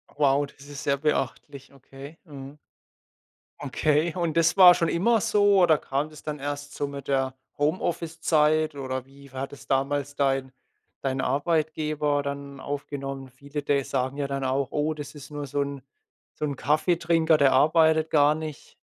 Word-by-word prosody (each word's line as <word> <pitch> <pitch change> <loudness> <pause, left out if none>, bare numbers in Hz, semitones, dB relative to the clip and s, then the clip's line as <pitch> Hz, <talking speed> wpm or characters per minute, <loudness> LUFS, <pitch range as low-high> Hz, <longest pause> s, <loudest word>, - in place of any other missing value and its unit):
Wow, 145 0 +3
das 140 0 -16
ist 145 0 -8
sehr 140 -1 +1
beachtlich. 140 -1 -3
Okay. 135 +3 -12
Mhm. 140 -2 -10 1.0
Okay. 150 +3 0
Und 170 -2 -1
das 165 +2 +3
war 180 -2 +9
schon 170 -2 0
immer 225 +7 +2
so? 205 -2 +4
Oder 160 -3 +5
kam 140 +2 -2
das 155 -1 -13
dann 150 -1 -5
erst 145 0 -5
so 145 - -2
mit 140 0 -8
der 135 -1 0 0.2
Homeoffice-Zeit? 155 -1 +1
Oder 130 -2 -4
wie 140 0 -17
war 135 +1 -4
das 145 - -13
damals 140 +1 -1
dein 135 -2 0 0.5
dein 135 -1 -1
Arbeitgeber 150 0 0
dann 140 -1 -6
aufgenommen? 135 -1 -5
Viele 140 +3 -7
de 140 -1 +1
sagen 130 +1 -2
ja 140 - -1
dann 140 0 -3
auch, 130 0 0
oh, 150 +1 0
das 150 0 -9
ist 150 +1 -11
nur 145 -1 -5
so 145 +2 -1
'n 140 -1 -4 0.5
so - - -2
'n 145 -2 -3
Kaffeetrinker, 165 +2 +2
der 140 -2 +4
arbeitet 160 +3 +4
gar 150 0 +4
nicht. 155 -2 -8
145 Hz, 165 wpm, -26 LUFS, 140-155 Hz, 1.0 s, war